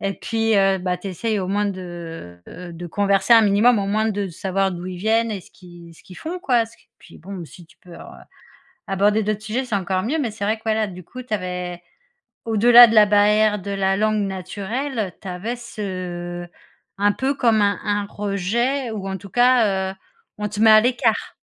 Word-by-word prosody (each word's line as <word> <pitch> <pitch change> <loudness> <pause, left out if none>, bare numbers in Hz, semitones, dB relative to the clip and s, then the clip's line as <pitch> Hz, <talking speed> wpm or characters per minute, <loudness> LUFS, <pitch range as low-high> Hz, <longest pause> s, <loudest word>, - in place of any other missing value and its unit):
et 195 0 -1
puis, 225 -1 0
heu, 195 -1 +3
bah 180 0 -2
tu 195 - -7
essaies 215 +3 -2
au 185 - -4
moins 205 +1 0
de, 170 - -8
heu - - -11 0.2
heu, - - -10
de 175 +1 -7
converser 200 +4 +2
un 225 - +7
minimum, 210 +3 +4
au 195 - -2
moins 215 +2 0
de 200 -1 -3
savoir 190 +3 -1
d'où 175 0 -7
ils 185 -1 -6
viennent 225 +3 +1
et 200 - -4
ce - - -19
qu'ils 175 -2 -15
ce - - -19
qu'ils 180 - -13
font 350 +3 -5
quoi. 240 -7 +2
Ce 235 - -19
qui - - -29
puis 170 - -16
bon, 185 0 -8
si 170 +1 -14
tu - - -24
peux 175 -1 -14
alors, - - -12 0.7
aborder 205 +3 +2
d'autres 210 0 -2
sujets, 230 +5 -2
c'est 230 - -2
encore 190 -1 -1
mieux. 295 +8 -1
Mais 240 -7 -2
c'est 205 -1 -5
vrai 215 +2 +1
que, 220 - -24
voilà 220 -1 +1
du 180 -2 -10
coup, 255 +9 -10
tu 230 - -6
avais, 180 -2 -4 0.6
au-delà 235 +2 +8
de 225 - -1
la 210 -1 +8
barrière 210 +1 +3
de 200 +2 -6
la 195 -1 +1
langue 215 0 +1
naturelle, 200 - -4
tu 195 - -9
avais 200 +7 -4
ce 180 -6 -6 0.5
un 205 +1 +3
peu 270 +2 -1
comme 230 -5 +2
un 200 0 +1
un 205 -1 0
rejet 225 +7 -2
ou 200 -3 -5
en 190 0 -3
tout 200 - -12
cas, 215 -5 +3
heu, - - -12 0.4
on 210 0 -2
te 210 +1 -6
met 220 0 +7
à 215 0 +8
l'écart. 240 -2 0
205 Hz, 220 wpm, -21 LUFS, 185-220 Hz, 0.7 s, au-delà